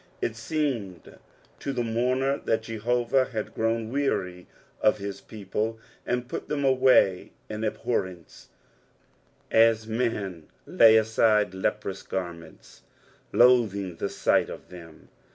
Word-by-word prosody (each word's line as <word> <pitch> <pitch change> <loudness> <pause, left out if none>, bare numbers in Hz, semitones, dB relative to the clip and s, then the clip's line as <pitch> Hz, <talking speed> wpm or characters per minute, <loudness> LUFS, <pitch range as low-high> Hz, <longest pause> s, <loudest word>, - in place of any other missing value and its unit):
It 115 - -2
seemed 115 - -4 0.4
to 140 - -3
the 120 - -1
mourner 125 +4 0
that 110 0 0
Jehovah 120 +3 0
had 110 -5 -5
grown 115 0 -1
weary 90 -10 -2 0.3
of 105 - +4
his 100 -1 -6
people 110 +1 -4 0.3
and 125 0 -1
put - - -6
them 140 -2 -1
away 130 -8 +3 0.2
in 105 +1 -5
abhorrence, 95 -6 -3 1.0
as 115 -1 +4
men 105 -8 -3 0.2
lay 110 -1 +6
aside 110 -2 +2
leprous 95 - -3
Karments, 85 -3 -7 0.5
loathing 105 -8 +3
the - - -2
sight - - +1
of - - -10
tbem. 85 -3 -13
110 Hz, 115 wpm, -26 LUFS, 95-125 Hz, 1.0 s, lay